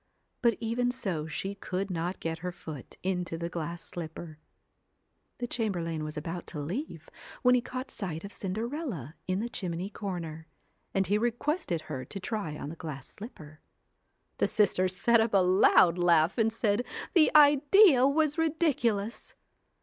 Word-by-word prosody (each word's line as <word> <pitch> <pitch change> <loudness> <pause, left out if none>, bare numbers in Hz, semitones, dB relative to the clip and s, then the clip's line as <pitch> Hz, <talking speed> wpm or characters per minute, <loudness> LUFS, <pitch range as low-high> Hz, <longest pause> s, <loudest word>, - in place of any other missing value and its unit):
But 235 -3 +3
even 235 +2 0
so 180 -11 -2
she 190 +5 -3
could 195 0 -4
not 175 +2 -2
get 165 0 -3
her 180 +1 -4
foot 155 -6 -9
into 180 -3 -1
the 170 +1 -3
glass 170 0 -5
slipper. 160 -2 -7 1.0
The 245 - -3
chamberlain 175 -10 -2
was 155 0 -6
about 165 +3 -5
to 155 - -6
leave 170 - -5 0.4
when 250 - +6
he 250 - +4
caught 255 +2 -6
sight 165 -5 -5
of 200 0 -8
Cinderella 215 - -4
in 185 +2 0
the 235 - -2
chimney 185 -3 -4
corner, 170 -6 -5 0.4
and 195 0 +1
he 205 +2 +2
requested 240 - -1
her 130 -4 -5
to 195 - -7
try 185 -6 -3
on 145 - -6
the 165 - -7
glass 150 -5 -7
slipper. 155 - -11 0.8
The - - +3
sisters 185 -3 +2
set 235 +4 +4
up 225 -2 +1
a - - +8
loud 180 -1 +5
laugh, 170 -1 +4
and 225 0 +3
said 220 0 +1 0.3
the 325 -4 +6
idea 295 - +7
was 305 +2 +1
ridiculous! 255 -10 0
190 Hz, 155 wpm, -29 LUFS, 165-235 Hz, 1.0 s, a